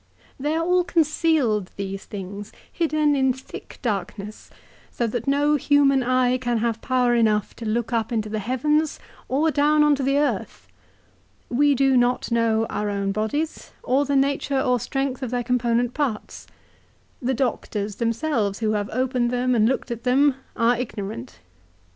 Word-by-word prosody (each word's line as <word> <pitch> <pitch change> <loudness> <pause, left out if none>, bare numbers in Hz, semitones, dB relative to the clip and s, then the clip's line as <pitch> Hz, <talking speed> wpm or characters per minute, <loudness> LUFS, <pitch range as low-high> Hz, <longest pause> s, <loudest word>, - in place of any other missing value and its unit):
" - - -31
They 295 +3 -1
are 330 0 0
all 360 +1 +3
concealed, 310 - +1
these 195 -1 -5
things, 200 +1 -7 0.2
hidden 310 -3 +1
in 265 -1 +2
thick 260 +1 -11
darkness, 210 -1 -4 0.4
so 240 - -2
that 230 +1 -3
no 290 +2 +3
human 280 -1 +3
eye 255 0 +2
can 240 -2 -1
have 225 0 -1
power 250 -1 +2
enough 215 -3 +1
to 230 - -6
look 235 +2 -1
up 225 -1 0
into 220 -2 -1
the 215 0 -3
heavens, 300 +8 0 0.3
or 300 +5 +2
down 300 +1 +3
on 295 0 +5
to 280 - -1
the 275 +1 +1
earth. 290 0 -2 0.8
We 285 +3 +3
do 270 0 +3
not 245 0 +1
know 225 -1 +2
our 210 0 -2
own 200 -1 -1
bodies, 220 +10 -3
or 270 +3 +2
the 285 0 0
nature 275 0 +1
or 250 -1 +1
strength 270 +2 -2
of 260 - -3
their 245 0 -1
component 240 0 +1
parts. 270 -8 -3 0.7
The 260 +1 0
doctors 210 -5 -2
themselves, 230 -3 0
who 220 -1 0
have 205 -1 -1
opened 250 0 0
them 250 +1 0
and 225 -1 +3
looked 265 -1 -2
at 235 -1 -4
them, 270 +3 +4 0.2
are 235 0 +3
ignorant. 200 - -6
250 Hz, 165 wpm, -23 LUFS, 220-280 Hz, 0.8 s, on